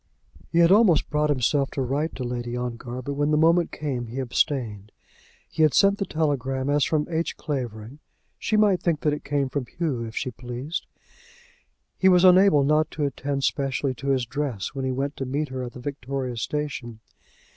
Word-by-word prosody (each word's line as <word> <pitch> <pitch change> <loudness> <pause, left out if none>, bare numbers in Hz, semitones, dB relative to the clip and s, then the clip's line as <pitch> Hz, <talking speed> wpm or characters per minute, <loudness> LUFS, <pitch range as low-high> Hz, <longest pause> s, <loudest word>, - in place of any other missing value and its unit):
He - - 0
had 170 +1 +6
almost 195 -7 +4
brought 150 0 +1
himself 140 0 +1
to 135 - -3
write 145 +6 -2
to 130 - -4
Lady 120 0 -3
Ongar, 125 +1 -5
but 140 - -3
when 145 +1 0
the 150 - +3
moment 165 +2 +3
came 130 -6 -3
he 120 +4 -8
abstained. 120 -5 -1 0.6
He - - -3
had 155 -2 +4
sent 200 0 +4
the 195 - -2
telegram 135 -3 -1
as 145 -1 +3
from 150 +1 +1
H. 165 0 -2
Clavering. 125 -2 -5 0.4
She 215 - 0
might 205 -4 +3
think 165 -4 0
that 150 - +1
it 150 - -5
came 140 -1 0
from 130 -1 -3
Hugh 150 -7 -2
if 115 -1 -8
she 130 - -2
pleased. 125 +7 -5 1.1
He 190 - +5
was 180 -1 +5
unable 185 -5 +6
not 150 +2 +2
to 150 - +1
attend 140 0 -3
specially 135 -1 0
to 130 +3 -8
his 130 -3 +2
dress 130 -6 -3
when 135 -2 -3
he 130 - 0
went 140 +3 -3
to 135 - -3
meet 145 +3 -2
her 130 0 -4
at 125 -1 -6
the - - -9
Victoria 135 -1 -4
Station. 120 -2 -4
140 Hz, 195 wpm, -25 LUFS, 125-155 Hz, 1.1 s, had